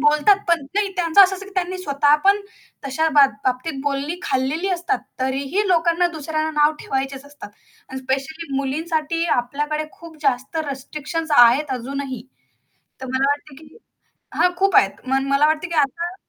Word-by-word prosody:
बोलतात 300 +7 +4
पण. 340 -1 +3
नाही 410 0 +1
त्यांचं 345 +2 +6
असं 385 0 +3
असतं, 395 +1 -10
की 400 - -13
त्यांनी 370 0 -2
स्वतः 290 -3 +2
पण 400 +1 +4 0.5
तशा 315 +4 0
बाब 275 -2 +7
बाबतीत 260 +3 -2
बोलणी 285 +4 -2
खाल्लेली 275 +7 -1
असतात. 350 -1 -1 0.2
तरीही 275 +10 -1
लोकांना 340 0 +3
दुसऱ्यांना 310 0 -3
नाव 295 +1 +5
ठेवायचेच 270 0 -3
असतात. 285 -5 -11 0.4
आणि 265 - -6
स्पेशली 275 +4 -4
मुलींसाठी 315 +4 -1
आपल्याकडे 295 +5 -2
खूप 335 -2 -13
जास्त 270 +2 -1
रिस्ट्रिक्शन्स 305 +4 -5
आहेत 250 +5 +6
अजूनही. 270 0 -5 0.8
तर 260 - -6
मला 270 +2 +2
वाटतं 290 0 -4
की 305 - -17 0.6
हां, 360 - +3
खूप 390 0 +2
आहेत. 195 - +5 0.2
मन 270 +1 +1
मला 275 +2 +4
वाटतं 315 +3 0
की 340 - -5
आता 335 +5 0
295 Hz, 160 wpm, -21 LUFS, 270-335 Hz, 0.8 s, बाब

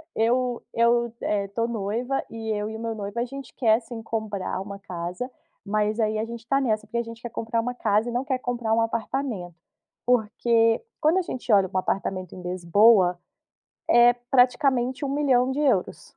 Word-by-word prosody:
eu 245 +2 +1
eu, 235 0 +2
eh, 200 -1 0
tô 230 +3 -1
noiva, 235 +4 -2
e 225 -1 -6
eu 210 0 -2
e 220 - -6
o - - -6
meu 225 0 -3
noivo, 205 +2 -5
a 240 - 0
gente 275 +2 -9
quer 225 -3 +3
sim 230 0 -8
comprar 215 -5 -3
uma 200 0 -7
casa, 180 +5 -5 0.4
mas 210 +2 0
aí 215 -1 +1
a 215 - -1
gente 230 0 -8
tá 275 +2 +2
nessa, 215 -5 0
porque 235 - -4
a 235 - +1
gente 230 0 -10
quer 240 - -5
comprar 230 +1 -2
uma 245 +2 -3
casa 215 0 +1
e - - -3
não 245 +3 -1
quer 260 -1 -1
comprar 240 -3 -1
um 230 - +3
apartamento. 225 -6 -3 0.5
Porque 230 - +2 0.2
quando 325 +4 +3
a - - +2
gente 255 -8 -3
olha 195 -2 +5
um 185 - +1
apartamento 185 -1 -2
em 180 - -9
Lisboa, 180 +1 +4 0.7
é 240 +1 +7
praticamente 250 +2 +2
€1.000.000,00. 265 - +1
230 Hz, 180 wpm, -25 LUFS, 210-245 Hz, 0.7 s, é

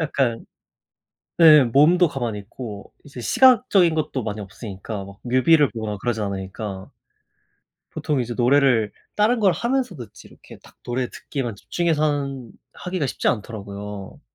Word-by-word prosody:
약간 135 -7 -1 0.9
네 155 -3 +8
몸도 155 +9 +4
가만히 120 -7 -4
있고 105 0 -9
이제 140 -3 -10
시각적인 240 - +4
것도 145 -5 -2
많이 105 -1 -4
없으니까 100 +1 -7
막 100 +1 -13
뮤비를 130 +5 +4
보거나 110 -2 -4
그러지 110 +2 -2
않으니까. 95 0 -5 1.0
보통 145 -4 -1
이제 120 0 -5
노래를 125 -4 +3 0.2
다른 220 +3 +2
걸 200 -3 +4
하면서 245 -1 -1
듣지 120 -8 -11
이렇게 - - -16
딱 - - -19
노래 125 0 -2
듣기에만 125 -7 -5
집중해서 160 - -1
하는 140 -5 -2 0.2
하기가 180 -5 -3
쉽지 - - -2
않더라고요. 105 -3 -5
125 Hz, 330 characters per minute, -22 LUFS, 105-155 Hz, 1.0 s, 네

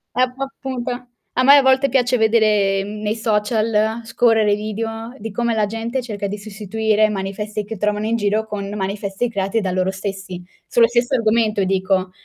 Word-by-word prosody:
Ecco, 255 +1 0
appunto. 250 -2 -5 0.3
A 255 - +2
me 280 +2 +8
a - - +6
volte 265 +1 +4
piace 250 -1 +2
vedere, 215 -3 +3
mhmm, 210 +1 -7
nei 210 +1 -1
social, 220 0 0
scorrere 225 -2 +3
i - - +4
video, 225 +3 -5
di 220 0 -6
come 235 +2 0
la 215 -1 +2
gente 225 +4 -3
cerca 205 -4 -4
di 205 - -4
sostituire 215 +1 0
manifesti 210 +2 -4
che 220 +1 -6
trovano 210 +1 -1
in 225 +1 +1
giro 215 0 0
con 200 -2 -5
manifesti 200 +3 -2
creati 195 +2 0
da 190 -3 -2
loro 185 +1 0
stessi. 190 -1 -5 0.2
Sullo 235 -1 +4
stesso 240 +2 +1
argomento 220 -2 +2
e - - +2
dico: 185 0 0
215 Hz, 180 wpm, -20 LUFS, 200-230 Hz, 0.3 s, me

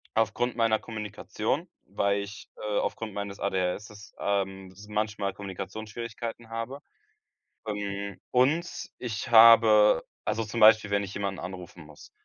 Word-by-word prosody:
aufgrund 115 +2 +1
meiner 115 -2 +3
Kommunikation, 105 -2 -4 0.2
weil 100 0 0
ich, 100 0 -9
äh, 105 -1 -1
aufgrund 110 -2 -3
meines 100 -1 -5
ADHS, 100 +2 -3
ähm, 95 -1 -2
s 100 +3 -14
manchmal 105 -2 -1
Kommunikationsschwierigkeiten 110 +4 -6
habe. 115 +4 -5 0.9
Hm, 100 -2 -4
und 145 +8 +1
ich 110 -5 -4
habe 110 -4 +7 0.2
also 110 +1 -1
zum 115 +2 -4
Beispiel, 110 -1 +7
wenn 100 0 +2
ich 95 - -7
jemanden 100 -1 -3
anrufen 90 -2 -8
muss. 75 -1 -15
105 Hz, 125 wpm, -28 LUFS, 100-115 Hz, 0.9 s, habe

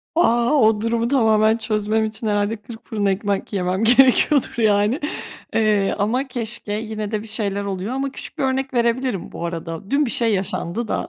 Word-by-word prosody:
A, 240 -5 +3
o 220 -6 +4
durumu 230 +1 0
tamamen 220 -4 +3
çözmem 220 0 0
için 220 +1 -5
herhâlde 205 +1 +1
kırk 220 +2 -12
fırın 210 -2 -2
ekmek 200 +1 -1
yemem 185 +2 0
gerekiyordur, 260 +3 +4
yani. 210 +2 +2 0.5
Eee, 210 -3 +2
ama 245 +7 0
keşke 235 -4 -4
yine 215 -1 -4
de 215 -1 -1
bir - - -11
şeyler 205 -2 -2
oluyor 200 +4 -3
ama 270 0 -2
küçük - - -7
bir - - -1
örnek 265 0 -1
verebilirim 235 -3 0
bu 170 - -5
arada, 165 +2 -6
dün 290 +1 +3
bir 235 - -3
şey 230 -3 +1
yaşandı 195 +3 -2
da. - - -2
220 Hz, 180 wpm, -21 LUFS, 205-240 Hz, 0.5 s, o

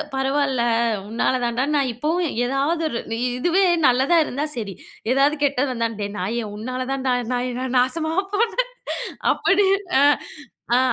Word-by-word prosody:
பரவால்ல 270 -1 +1 0.5
உன்னால 230 +4 0
தாண்டா, 240 +1 0
நா - - +3
இப்போவும் 320 +8 -1 0.2
ஏதாவது 275 +6 0
ஒரு 235 - -3
வு - - 0 0.2
இதுவே 350 +8 +2 0.2
நல்லதா 265 +7 +3
இருந்தா 285 +3 -2
சரி. 205 -4 -4 0.4
எதாவது 275 +3 +3
கெட்டது 280 -1 +1
வந்தா, 230 -2 0
"டேய் 200 0 -3
நாயே 225 +6 -2
உன்னால 255 +4 -4
தான்டா 265 -1 0 0.2
நான் 250 +1 -2
நாசமா 315 +6 0 0.2
போனேன்". 470 +4 0 0.6
அப்படி 400 +1 +2 0.3
ஆ - - +4 0.7
அ - - +5
265 Hz, 135 wpm, -22 LUFS, 245-305 Hz, 0.7 s, அ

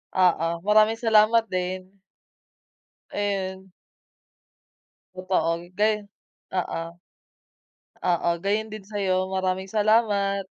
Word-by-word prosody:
Oo 180 -3 +3 0.2
maraming 215 +2 +4
salamat 225 0 +4
din. 185 +1 -4 1.1
Ayon. 190 -2 -3 1.4
Totoo 175 -2 -1
gayon 210 -1 +1 0.5
oo. 170 -2 -3 1.1
Oo 170 -1 +1
gayon 215 +2 0
din 215 -2 -9
sayo, 195 -3 0
maraming 190 0 -1
salamat. 205 -2 +2
195 Hz, 80 wpm, -25 LUFS, 185-210 Hz, 1.4 s, maraming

